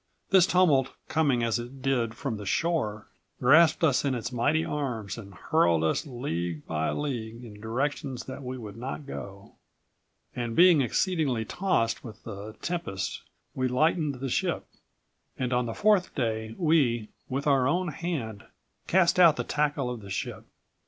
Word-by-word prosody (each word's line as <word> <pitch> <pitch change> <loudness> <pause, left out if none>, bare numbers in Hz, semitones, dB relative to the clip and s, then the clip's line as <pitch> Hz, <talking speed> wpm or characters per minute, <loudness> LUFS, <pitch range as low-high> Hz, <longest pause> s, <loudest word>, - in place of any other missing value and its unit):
This 190 -2 +6
tumult, 155 -9 +3
coming 140 -7 +2
as 115 0 +1
it 125 +3 -9
did 120 -4 0
from 120 -3 -3
the 105 - -7
shore, 110 - 0 0.3
grasped 155 +6 +5
us 140 -6 +4
in118 135 -2 0
its 120 +1 -4
mighty 145 +7 +1
arms 120 -9 -3
and 100 -4 -10
hurled 85 -2 +2
us 80 - 0
league 85 - -4
by 80 0 -1
league 120 -5 -4
in 105 -3 -11
directions 130 +2 -2
that 130 +1 -8
we 130 0 -5
would 105 -4 -9
not 130 +4 -5
go. 100 -7 -9 0.8
And 120 -2 -3
being 175 -4 +7
exceedingly 135 - 0
tossed 180 - 0
with 110 -2 -10
the 105 0 -7
tempest 100 - -3 0.3
we 130 0 0
lightened 150 +3 +1
the 130 +1 -4
ship. - - -1 0.7
On 125 -1 0
the 115 - -4
fourth 205 -3 +2
day 110 -3 -2
we, 135 - +2 0.2
with 135 +2 -2
our 135 -3 +3
own 175 +4 +1
hand, 140 -10 -4 0.4
cast 180 -1 +3
out 170 -4 +8
the - - -2
tackle 145 -4 0
of 120 -3 -6
the 100 - -10
ship. 95 - -4
125 Hz, 160 wpm, -28 LUFS, 110-150 Hz, 0.8 s, out